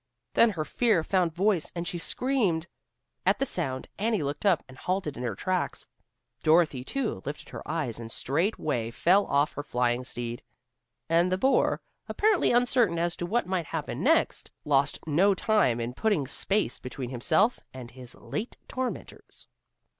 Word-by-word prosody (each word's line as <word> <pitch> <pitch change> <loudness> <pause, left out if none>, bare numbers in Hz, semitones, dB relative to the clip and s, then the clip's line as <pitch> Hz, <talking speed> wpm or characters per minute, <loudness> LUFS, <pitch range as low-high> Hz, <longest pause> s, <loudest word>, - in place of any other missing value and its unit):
Then 230 - +6
her 165 -7 -3
fear 215 -6 +2
found 180 -1 +1
voice 185 0 +1
and 170 0 -3
she 175 - -3
screamed. 205 -8 0 0.6
At - - +3
the 275 - 0
sound 135 - -1
Annie 215 -4 +1
looked 145 +8 -2
up, 180 -6 +3
and 130 - -13
halted 180 -1 -2
in - - -7
her 120 -5 -2
tracks. 185 - -2 0.6
Dorothy, 155 -5 +3
too, 265 - -3
lifted 145 +1 -6
her - - -7
eyes 150 -8 -2
and 115 -1 -7
straightway 145 - -1
fell 185 - +3
off 140 +2 +2
her 145 - -4
flying 125 -2 0
steed. 120 -1 -4 0.7
And 170 +2 +3
the 185 - +2
boar, 265 +7 +2 0.3
apparently 425 -3 +3
uncertain 240 -6 +3
as 170 +1 0
to 175 - -3
what 235 +6 +1
might 180 -4 -2
happen - - -4
next, - - +2
lost 140 -1 +2
no 180 +6 +3
time 195 - +2
in 120 +1 -3
putting 200 - +1
space 195 - +1
between 125 0 -6
himself 195 - +2
and 125 -2 -9
his 125 -1 -8
late 220 +4 -5
tormentors. 255 -1 -6
165 Hz, 160 wpm, -28 LUFS, 130-205 Hz, 0.7 s, Then